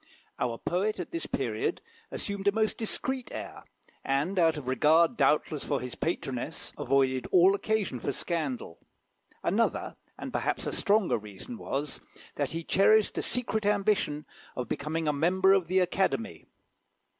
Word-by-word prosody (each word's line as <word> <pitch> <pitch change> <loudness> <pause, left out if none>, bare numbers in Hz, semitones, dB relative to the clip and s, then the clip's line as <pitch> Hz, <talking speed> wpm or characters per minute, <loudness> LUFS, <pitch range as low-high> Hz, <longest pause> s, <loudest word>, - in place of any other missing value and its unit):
Our 120 -2 -1
poet 195 - -1
at 180 - -5
this 165 -1 -3
period 115 -5 -1 0.3
assumed 200 0 -4
a - - +6
most 220 +1 +1
discreet 255 +3 -3
air, - - -7 0.4
and 145 +8 0
out 165 -2 +4
of 140 -4 -7
regard, 160 - +4
doubtless, 150 -6 +2
for 140 - -1
his 125 -1 -6
patroness, - - -3
avoided 130 -1 +1
all 185 +1 +6
occasion 205 - -1
for 140 - -2
scandal. 140 - -3 0.6
Another, - - 0 0.2
and - - -7
perhaps - - -1
a - - -2
stronger 205 - +2
reason 105 - -9
was, 145 - -4 0.3
that - - -1
he 165 0 -3
cherished 215 +5 +4
a - - 0
secret 230 -3 -1
ambition 200 -7 +1 0.3
of 125 -2 -3
becoming 155 +5 -2
a 150 - +2
member 185 +6 +4
of 190 -4 +2
the 185 +2 +1
Academy. 190 +4 0
170 Hz, 150 wpm, -29 LUFS, 140-200 Hz, 0.6 s, a